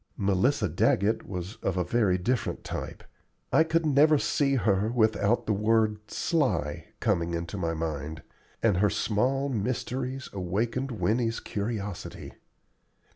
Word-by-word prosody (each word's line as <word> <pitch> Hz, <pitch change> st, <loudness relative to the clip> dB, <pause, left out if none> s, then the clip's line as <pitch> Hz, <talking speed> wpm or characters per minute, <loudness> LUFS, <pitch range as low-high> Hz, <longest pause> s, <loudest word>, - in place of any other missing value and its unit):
Melissa 105 Hz, +5 st, +2 dB
Daggett 100 Hz, +6 st, +1 dB
was 90 Hz, +2 st, -5 dB
of 95 Hz, -, -2 dB
a 90 Hz, -, +2 dB
very 95 Hz, -1 st, +2 dB
different 120 Hz, +6 st, -1 dB
type -, -, -6 dB, 0.5 s
I 160 Hz, -, +6 dB
could 165 Hz, 0 st, +1 dB
never 150 Hz, +1 st, +5 dB
see 140 Hz, -1 st, +1 dB
her 105 Hz, -3 st, +2 dB
without 110 Hz, -1 st, +2 dB
the 110 Hz, -, +1 dB
word 105 Hz, +1 st, +2 dB
"sly" 85 Hz, -, 0 dB
coming 85 Hz, -6 st, 0 dB
into 85 Hz, +2 st, -4 dB
my 85 Hz, -4 st, -1 dB
mind 80 Hz, -1 st, -4 dB, 0.4 s
and 105 Hz, -5 st, +3 dB
her 105 Hz, +2 st, +3 dB
small 125 Hz, +6 st, 0 dB
mysteries 130 Hz, +2 st, -2 dB
awakened 110 Hz, +8 st, -1 dB
Winnie's 115 Hz, 0 st, 0 dB
curiosity. 105 Hz, -2 st, -5 dB
105 Hz, 130 wpm, -28 LUFS, 95-125 Hz, 0.5 s, I